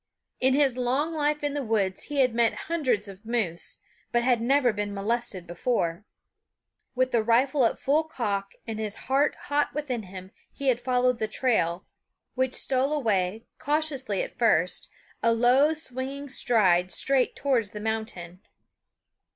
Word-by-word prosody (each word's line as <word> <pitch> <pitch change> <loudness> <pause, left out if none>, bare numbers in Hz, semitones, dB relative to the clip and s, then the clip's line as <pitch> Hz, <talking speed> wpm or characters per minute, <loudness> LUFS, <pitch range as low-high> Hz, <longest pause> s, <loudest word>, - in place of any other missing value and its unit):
In 260 +1 +3
his 275 -3 +2
long 270 +6 0
life 300 -1 0
in 290 -1 -1
the 290 - -2
woods 205 -5 0
he 290 -2 0
had 250 -3 +2
met 230 -1 +1
hundreds 250 -11 0
of 195 +1 -11
moose, 220 -8 -2 0.3
but 240 0 +2
had 245 -2 +2
never 255 -1 +3
been 205 0 -3
molested 205 -2 -2
before. 175 -1 -2 0.9
With 255 0 +1
the 235 - +3
rifle 250 +4 +3
at - - -4
full 300 +4 +1
cock 205 -10 -3
and 225 -1 -5
his 215 -1 -2
heart 275 +3 +2
hot 290 0 -1
within 275 -6 -2
him, 185 -1 -10 0.2
he 275 -1 -1
had 245 -1 +1
followed 250 -1 +1
the 220 - -1
trail, 215 -7 0 0.5
which 260 0 0
stole 265 +1 +1
away, 220 -7 0
cautiously 285 -8 -1
at - - -8
first, 185 -7 +2 0.3
a 230 - +3
long 255 +7 +4
swinging 275 -1 -4
stride 190 -9 +3
straight 265 +6 +3
towards 250 -7 0
the 210 - -8
mountain. 210 -5 -4
240 Hz, 155 wpm, -26 LUFS, 210-270 Hz, 0.9 s, long